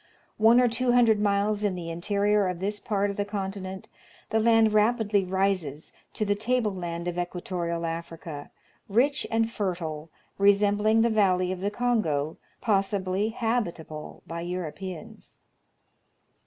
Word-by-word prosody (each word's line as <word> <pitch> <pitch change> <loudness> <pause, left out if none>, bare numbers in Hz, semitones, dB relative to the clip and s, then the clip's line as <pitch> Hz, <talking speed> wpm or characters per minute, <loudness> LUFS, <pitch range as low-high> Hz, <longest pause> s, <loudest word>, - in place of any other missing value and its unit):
One 225 +3 +6
or 250 - +5
two 245 +1 +1
hundred 230 -3 +5
miles 205 +1 +1
in 200 -3 +1
the 170 -2 -5
interior 200 +3 +1
of 180 -2 -3
this 205 +2 -2
part 205 0 0
of 200 - -9
the 205 - +1
continent, 195 -2 -5 0.4
the 220 - +3
land 225 -1 +4
rapidly 215 -2 +3
rises 185 -6 0 0.2
to 215 - 0
the 205 - +2
tableland 200 -7 -2
of 175 0 -3
equato 175 0 -3
rial 170 0 -2
Africa, 165 -2 -6 0.4
rich 265 +8 +2
and 225 0 +2
fertile, 170 -8 -4 0.3
resembling 205 +2 +4
the 235 - +2
valley 185 -4 +2
of 185 - -4
the 200 - 0
Kongo, 205 -11 0 0.2
possibly 195 -1 +1
habitable 210 -10 -3
by 170 0 -5
Europeans. 185 +4 -7
200 Hz, 140 wpm, -27 LUFS, 175-220 Hz, 0.4 s, One